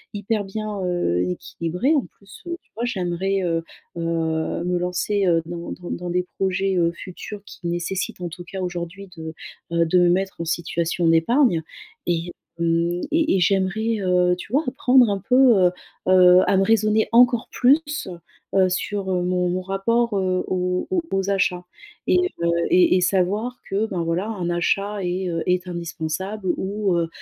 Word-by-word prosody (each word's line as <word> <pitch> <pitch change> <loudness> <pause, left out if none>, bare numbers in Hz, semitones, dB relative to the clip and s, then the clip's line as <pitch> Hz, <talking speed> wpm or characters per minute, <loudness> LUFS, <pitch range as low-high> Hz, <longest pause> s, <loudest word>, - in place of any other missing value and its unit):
hyper 205 0 -1
bien, 210 0 -4
heu, 175 - 0
équilibré, 175 - -1
en 275 - +1
plus, 200 0 -15
heu, 345 0 -3
tu - - -38
vois, 235 +2 -2
j'aimerais, 190 -2 -1
heu, 165 -1 0 0.3
heu, - - -3 0.6
me 180 0 0
lancer, 185 +3 0
heu, 165 -1 +3
dans 170 0 -6
dans 175 -1 -7
dans 175 0 -4
des 180 +1 0
projets, 195 0 0
heu, 170 -1 +2
futurs 195 +4 -9
qui 175 - -8
nécessitent, 175 +2 -3
en 175 - -3
tout 175 +2 -9
cas 190 +1 -6
aujourd'hui 180 +2 -5
de, 160 0 -7 0.4
heu, 170 0 +3
de 180 +3 +3
me 175 0 +4
mettre 190 0 0
en - - -3
situation 170 0 -1
d'épargne 165 - +3 0.5
et, 175 0 -1 0.3
mmh, 170 +1 +1
et 315 -7 +2
et - - +1
j'aimerais, 200 +5 +1
heu, 180 -1 +3
tu 190 - -10
vois, 300 +3 +3
apprendre 255 -2 +4
un 200 - -1
peu, 250 - +4 0.3
heu, - - 0 0.4
heu, 180 0 +7
à 195 - +3
me 195 - +4
raisonner 215 0 +3
encore 240 0 +5
plus, 295 -1 +2 0.5
heu, 190 -1 +4
sur, 190 +1 -2
heu, 180 -1 0
mon 180 0 0
mon 185 +1 -1
rapport, 205 +4 0
heu, 185 -1 0
aux 180 0 -1
aux 360 -2 +2
aux 195 0 0
achats 185 -2 +1 0.4
et 365 - +4 0.3
heu, 170 - +2 0.2
et 350 - +5
et - - +1
savoir 200 +7 0
que, 205 +3 0
ben, 175 -4 -2
voilà, 170 +5 -1
un 185 -6 -3
achat 195 +3 0
est, 180 +1 -2
heu, 165 -1 -2
est 180 0 +1
indispensable 175 +4 -4
ou, 200 -1 -1
heu, 165 -1 0
185 Hz, 180 wpm, -22 LUFS, 175-205 Hz, 0.6 s, heu